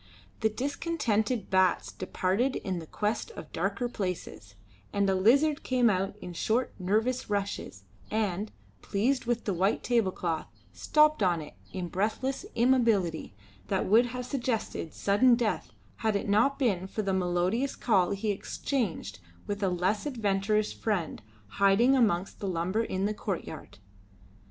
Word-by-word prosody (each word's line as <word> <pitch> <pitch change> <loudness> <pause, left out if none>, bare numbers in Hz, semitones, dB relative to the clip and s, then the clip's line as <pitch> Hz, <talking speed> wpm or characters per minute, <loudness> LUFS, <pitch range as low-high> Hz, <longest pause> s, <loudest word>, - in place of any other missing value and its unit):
The 220 - +2
discontented 250 - -1
bats 185 -2 +3
departed 190 +7 -1
in 185 -3 -3
quest 210 - -2
of - - -9
darker 245 - -1
places, 180 - -5 0.4
and 200 -1 +1
a 195 - +3
lizard 275 +11 +4
came 250 -3 +3
out 195 +1 -1
in 180 - -6
short, 230 +8 0
nervous 220 +8 0
rushes, 200 - -3 0.3
and, 210 -1 -1 0.3
pleased 245 +7 0
with 235 -1 -1
the 200 - 0
white 190 +5 +1
table 230 -6 +2
cloth, 165 -3 -3 0.3
stopped 305 - +3
on 180 -3 +3
it 150 -1 -9 0.2
in 185 -2 -4
breathless 225 - -2
immobility 225 - +2 0.3
that - - 0
would 230 +5 +5
have 250 +1 -5
suggested 240 - -3
sudden 235 +5 +4
death 230 -5 -1 0.3
had 220 -2 0
it 200 - -1
not 220 +8 +3
been 195 -9 0
for 215 +2 -3
the 195 -1 0
melodious 185 +8 0
call 190 -7 +2
he 200 +1 -1
exchanged 195 - -3 0.3
with 205 0 -4
a 195 - +2
less 185 +7 0
adventurous 210 -4 0
friend 185 - -2 0.2
hiding 200 - +4
amongst 200 -7 +1
the 200 - -3
lumber 185 +4 0
in 190 -3 -2
the 210 - 0
courtyard. 195 - -5
205 Hz, 145 wpm, -29 LUFS, 185-240 Hz, 0.4 s, would